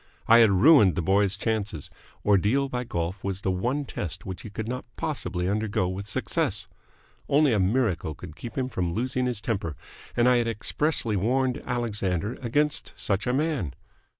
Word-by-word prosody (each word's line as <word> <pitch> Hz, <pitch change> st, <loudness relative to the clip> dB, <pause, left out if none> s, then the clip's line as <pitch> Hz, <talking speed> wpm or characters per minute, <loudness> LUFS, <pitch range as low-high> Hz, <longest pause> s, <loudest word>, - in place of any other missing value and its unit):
I 115 Hz, +1 st, +8 dB
had 115 Hz, -2 st, +7 dB
ruined 105 Hz, -, +6 dB
the 90 Hz, -, -1 dB
boy's 95 Hz, +2 st, +2 dB
chances. 105 Hz, -7 st, -2 dB, 0.3 s
Ordeal 105 Hz, +8 st, +3 dB
by 125 Hz, -1 st, -3 dB
golf 85 Hz, -2 st, -3 dB
was 95 Hz, -1 st, -3 dB
the 95 Hz, -, 0 dB
one 125 Hz, +10 st, -1 dB
test 85 Hz, -, -5 dB
which 95 Hz, -1 st, -6 dB
he -, -, -8 dB
could 110 Hz, +2 st, -5 dB
not 125 Hz, +2 st, -3 dB
possibly 90 Hz, -, -2 dB
undergo 105 Hz, -2 st, 0 dB
with 95 Hz, +2 st, -5 dB
success. 105 Hz, -, -1 dB, 0.6 s
Only 145 Hz, -2 st, +4 dB
a 105 Hz, -, +2 dB
miracle 95 Hz, -, +1 dB
could 80 Hz, 0 st, -10 dB
keep 115 Hz, -, -8 dB
him 130 Hz, -1 st, 0 dB
from 90 Hz, -8 st, -2 dB
losing 125 Hz, +2 st, 0 dB
his 120 Hz, -4 st, -2 dB
temper, 100 Hz, -9 st, -2 dB, 0.4 s
and 120 Hz, +1 st, +4 dB
I 125 Hz, -1 st, +5 dB
had 120 Hz, -1 st, +1 dB
expressly 115 Hz, +1 st, +1 dB
warned 125 Hz, +6 st, +1 dB
Alexander 105 Hz, -4 st, -1 dB
against 145 Hz, +5 st, 0 dB
such 100 Hz, +1 st, -1 dB
a 125 Hz, -, +1 dB
man. 140 Hz, -, -1 dB
110 Hz, 175 wpm, -26 LUFS, 95-125 Hz, 0.6 s, I